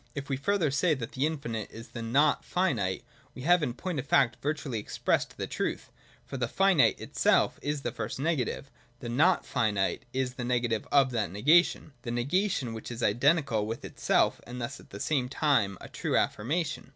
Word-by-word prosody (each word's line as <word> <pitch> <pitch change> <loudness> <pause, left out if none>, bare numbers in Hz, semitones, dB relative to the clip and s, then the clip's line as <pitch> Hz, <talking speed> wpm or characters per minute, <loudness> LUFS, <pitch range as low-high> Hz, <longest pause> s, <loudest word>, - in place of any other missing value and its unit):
If 140 0 -5
we 135 - +1
further 160 +2 +1
say 155 +4 +2
that 115 -4 -6
the 135 +3 0
infinite 115 -9 -4
is 115 +2 -11
the 120 - -7
not 140 +6 +2
finite, 115 - 0 0.3
we 125 - -8
have 175 +3 +4
in 125 -5 -2
point 180 -2 -3
of 135 - -5
fact 125 -4 +3
virtually 145 -5 -2
expressed 105 - -1
the - - -2
truth: - - -3 0.3
for 135 - -6
as - - -7
the 120 - 0
finite 190 +1 +3
itself - - +2
is 145 -1 -2
the 120 - -2
first 110 +3 -5
negative, 140 -2 -1 0.3
the 120 - -6
not 155 +10 +3
finite 105 -4 0
is 130 -1 -1
the 125 - -5
negative 120 -2 0
of 135 -2 +4
that 115 -7 -1
negation, 150 - +3
the 120 - -6
negation 130 - 0
which 110 - -7
is 120 0 -5
identical 120 -1 +2
with 115 +1 -5
itself - - +1
and 125 +1 -7
thus 120 +3 -5
at - - -17
the 100 - -9
same 130 0 0
time 125 - +1
a - - -10
true - - -1
affirmation. 150 +9 -1
130 Hz, 195 wpm, -29 LUFS, 115-150 Hz, 0.3 s, have